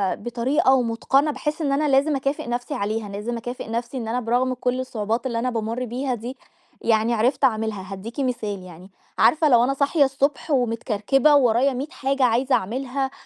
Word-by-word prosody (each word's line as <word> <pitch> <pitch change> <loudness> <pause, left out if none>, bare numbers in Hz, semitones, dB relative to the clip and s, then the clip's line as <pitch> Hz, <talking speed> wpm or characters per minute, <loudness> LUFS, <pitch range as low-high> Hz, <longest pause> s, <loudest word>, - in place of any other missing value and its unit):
بطريقة 250 +5 +1
ومتقَنة 265 +4 +2
باحس 300 +4 -3
إن 285 -3 0
أنا 295 +2 +1
لازم 280 +2 +3
اكافئ 275 -1 -2
نَفْسي 245 +4 -3
عليها 215 -3 -2
لازم 215 +4 -4
اكافئ 245 0 -6
نَفْسي 235 +3 -3
إن 230 -3 -4
أنا 235 +3 -1
برغم 250 +2 0
كل 250 +1 -2
الصعوبات 230 -2 -2
اللي 235 -3 -1
أنا 255 - 0
بامر 230 +1 -3
بيها 250 +2 -2
دي 240 +4 -7 0.4
يعني 225 +1 +2
عرفت 245 +5 +1
اعملها، 220 -5 0
هادّيكِ 225 +7 -8
مثال 220 -7 -2
يعني، 180 +2 -13 0.3
عارفة 310 0 +4
لو 240 -3 +5
أنا 270 +2 +1
صاحية 280 +2 +2
الصبح 275 +2 -1
ومتكركبة 245 +3 +2
وورايا 260 0 +3
مِيّة 270 +4 -4
حاجة 275 0 -1
عايزة 250 +3 +3
اعملها 265 +6 -2
250 Hz, 175 wpm, -23 LUFS, 225-270 Hz, 0.4 s, لو